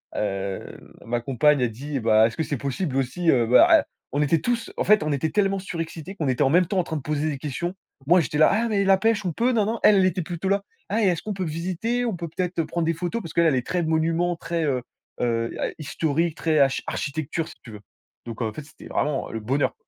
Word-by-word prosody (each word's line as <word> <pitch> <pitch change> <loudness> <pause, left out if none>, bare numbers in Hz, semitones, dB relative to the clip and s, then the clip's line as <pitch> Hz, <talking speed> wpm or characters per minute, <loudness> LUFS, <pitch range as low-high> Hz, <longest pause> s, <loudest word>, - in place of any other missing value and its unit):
Heu, 100 -2 -4
ma 120 +1 -1
compagne 140 +3 +3
elle 120 -2 +1
dit: 140 +5 -4
«Bah 110 -1 +4
est-ce 115 - -8
que 160 - 0
c'est 145 - -3
possible 140 +3 -3
aussi, 135 +6 0
heu, 120 -3 +3
bah, 125 - +7
eh» - - -12 0.3
on 145 - +2
était 155 +2 +2
tou 240 +9 +1 0.2
en - - +1
fait 215 0 +5
on 155 - -1
était 145 +3 -1
tellement 195 -1 +1
surexcités 165 -2 -6
qu'on 160 -7 -3
était 130 +2 +2
en 135 - +2
même 180 +2 +4
temps 195 - -2
en 180 - +3
train 160 -2 -4
de - - -5
poser 150 +2 -1
des 140 - -5
questions. 160 +5 -3 0.3
Moi 175 +5 +5
j'étais 150 - -3
là: 155 - +6
«Ah 230 +3 +1
mais 200 -2 +1
la 195 0 +5
pêche 215 0 +1
on 180 - 0
peu?» 235 +9 +1
ninin, 220 0 0
elle 195 -3 +6
était 185 0 0
plutôt 175 +3 -4
là: 200 0 +2 0.3
«Ah 215 +4 +1
et - - +4
est-ce 175 -3 0
qu'on 215 - -3
peut 190 -1 -3
visiter? 185 +10 -2
On 225 -5 -1
peut 170 -1 -5
peut-être 180 +1 -2
prendre 170 +1 -2
des 165 - +1
photos?» 175 +8 -3
parce 165 -6 -8
qu'elle 170 0 +3
elle 150 - +3
est 125 -2 -1
très 180 -1 0
monuments, 165 +2 +1
très, 170 0 -3
heu, 130 -4 0 0.4
heu, 115 -1 0
a - - 0
historique, 160 +2 -1
très 155 -2 +1
achi 135 -1 +2
architecture 155 +2 -3
si - - -12
tu 115 - -11
veux! 105 -1 -10 0.4
Donc 115 0 -7
en 110 -1 -2
fait, 155 - -7
c'était 145 - -14
vraiment 145 -3 -1
le 115 - -4
bonheur! 130 +7 0
160 Hz, 255 wpm, -24 LUFS, 135-185 Hz, 0.4 s, bah